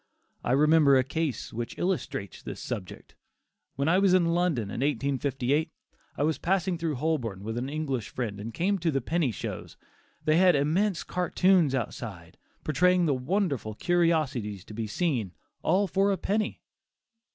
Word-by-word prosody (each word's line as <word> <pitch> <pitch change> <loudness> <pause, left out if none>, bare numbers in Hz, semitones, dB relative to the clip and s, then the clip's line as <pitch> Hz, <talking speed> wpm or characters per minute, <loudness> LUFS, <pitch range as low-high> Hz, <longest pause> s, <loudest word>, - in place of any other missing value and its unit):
I 120 - +1
remember 150 -1 +5
a 130 - +3
case 145 -2 -3
which 115 +1 -5
illustrates 170 - -3
this - - -7
subject. 105 -7 -6 0.6
When 140 +2 -1
I 180 +3 +4
was 195 -2 +4
in 170 -2 +3
London 160 - 0
in - - -4
1858, 140 +1 0 0.5
I - - +1
was 155 +1 0
passing 185 0 +1
down 165 -2 -2
Holborn 125 -9 -2
with 110 +1 -4
an 125 +3 -3
English 140 -7 -3
friend 110 -5 -4
and 110 +3 -5
came 190 - 0
to 170 -1 0
the 135 -3 +1
"penny 160 +2 0
shows." 115 - -6 0.5
They 155 +1 +4
had 180 -1 +6
immense 170 +7 +1
cartoons 180 -4 +2
outside, 120 -5 -6 0.2
portraying 180 +4 +3
the 150 - +2
wonderful 135 - -1
curiosities 150 - 0
to - - -11
be 110 0 -3
seen 115 - -1 0.3
"all 190 +5 +2
for 195 +2 +2
a 195 - 0
penny." 210 +4 -2
150 Hz, 160 wpm, -28 LUFS, 125-175 Hz, 0.6 s, had